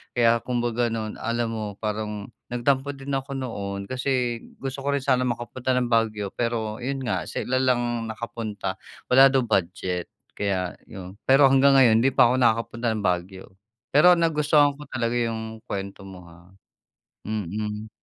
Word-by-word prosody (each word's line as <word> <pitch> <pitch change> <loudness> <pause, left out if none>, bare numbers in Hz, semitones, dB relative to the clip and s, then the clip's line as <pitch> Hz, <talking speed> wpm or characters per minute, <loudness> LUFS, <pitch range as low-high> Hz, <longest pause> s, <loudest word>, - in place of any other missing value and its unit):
Kaya 115 -1 +4
kumbaga 120 -1 0
noon, 110 -1 -4
alam 115 0 -1
mo 110 -1 -3
parang 105 -1 -3 0.2
nagtampo 130 +3 +1
din 135 +1 -7
ako 135 +1 -4
noon 100 -6 -5
kasi 125 -2 -1 0.2
gusto 135 0 -4
ko 140 - +1
rin - - +1
sana 130 -2 +2
makapunta 120 +2 -3
ng 125 -1 +1
Baguio 110 -3 +1
pero 115 -2 -2
'yon 135 +1 -2
nga - - -1
sila 130 - -2
lang 120 -2 0
nakapunta 110 -4 -5 0.3
wala 135 +2 +8
daw 135 - +4
budget 90 -3 -1 0.3
kaya 95 -3 -1
'yon. 95 -1 -9
Pero 135 +1 +7
hanggang 135 +1 +5
ngayon 115 -4 +6
hindi 135 - +3
pa - - +6
ako 125 - +2
nakakapunta 115 +1 +1
ng 105 - -4
Baguio 90 +1 -2 0.5
pero 175 +5 +7
nagustuhan 150 -3 +3
ko 150 - -9
talaga 120 -1 -1
yung 110 -1 -3
kuwento 100 0 -5
mo 95 -2 -11
ha, 85 +2 -18 0.8
mm. 105 +1 -4
115 Hz, 155 wpm, -25 LUFS, 105-130 Hz, 0.8 s, wala